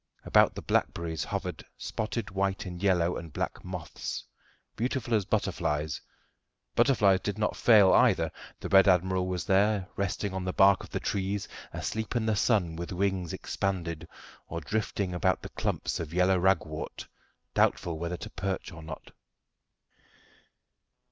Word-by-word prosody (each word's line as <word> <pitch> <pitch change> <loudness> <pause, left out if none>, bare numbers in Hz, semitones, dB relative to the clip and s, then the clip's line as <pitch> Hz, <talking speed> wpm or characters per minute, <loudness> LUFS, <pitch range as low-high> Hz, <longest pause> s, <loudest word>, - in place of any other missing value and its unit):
About - - +5
the - - -6
blackberries 80 -1 0
hovered - - -4
spotted 110 -1 -3
white 95 +1 -1
and 90 -1 -7
yellow 90 -3 +2
and 85 -2 -8
black - - -3
moths, 90 -2 -5 0.5
beautiful 120 0 -1
as 105 -3 +2
butterflies. 75 -3 -1 0.7
Butterflies 100 -8 +4
did 105 +1 -3
not 105 - 0
fail 105 -5 +6
either. - - +4 0.3
The - - -4
red 95 +1 +7
admiral 95 0 +3
was 90 -2 -2
there, 100 0 +3
resting 100 0 -2
on 95 -1 -3
the 90 0 -2
bark 95 -1 +5
of - - -11
the - - -2
trees, 100 0 -2 0.2
asleep 110 +2 -3
in 115 -2 +1
the 110 -1 +2
sun 100 -6 +2
with 85 +1 -5
wings 95 -2 0
expanded, 85 -4 -3 0.4
or 85 - -4
drifting 100 +2 -2
about 95 +1 +1
the - - -6
clumps - - -2
of 85 0 -5
yellow 90 +1 +4
ragwort, 85 -4 0 0.5
doubtful 80 -2 +1
whether 85 +1 -3
to - - -8
perch 95 -1 -3
or 80 -1 -10
not. 80 0 -9
95 Hz, 150 wpm, -29 LUFS, 85-100 Hz, 0.7 s, red